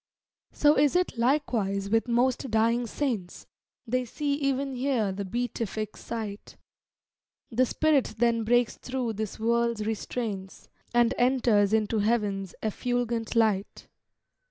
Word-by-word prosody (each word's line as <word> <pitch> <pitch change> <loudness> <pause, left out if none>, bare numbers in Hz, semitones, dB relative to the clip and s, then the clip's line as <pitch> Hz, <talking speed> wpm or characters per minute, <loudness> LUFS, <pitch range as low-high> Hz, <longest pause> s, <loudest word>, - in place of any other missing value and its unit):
So 295 0 +4
is 290 +2 +3
it, 360 -5 +1
likewise, 230 -6 0
with 225 +2 +2
most 250 +2 +1
dying 230 +2 +2
saints; 225 -9 -3 0.4
They 255 +2 0
see 285 +3 -2
e'en 275 0 -1
here 250 -5 0
the 200 +1 -4
beatific 220 0 -3
sight; 215 -3 -6 0.9
The 250 +2 +2
spirit 310 -2 +1
then 230 0 +2
breaks 240 +1 +2
thro' 255 -2 -3
this 215 -1 -5
world's 235 -1 +1
restraints, 215 -3 -4 0.2
And 240 -1 +3
enters 240 -5 +3
into 220 0 +1
heaven's 205 -4 0
effulgent 235 +1 -1
light. 215 -4 +1
235 Hz, 120 wpm, -27 LUFS, 215-250 Hz, 0.9 s, So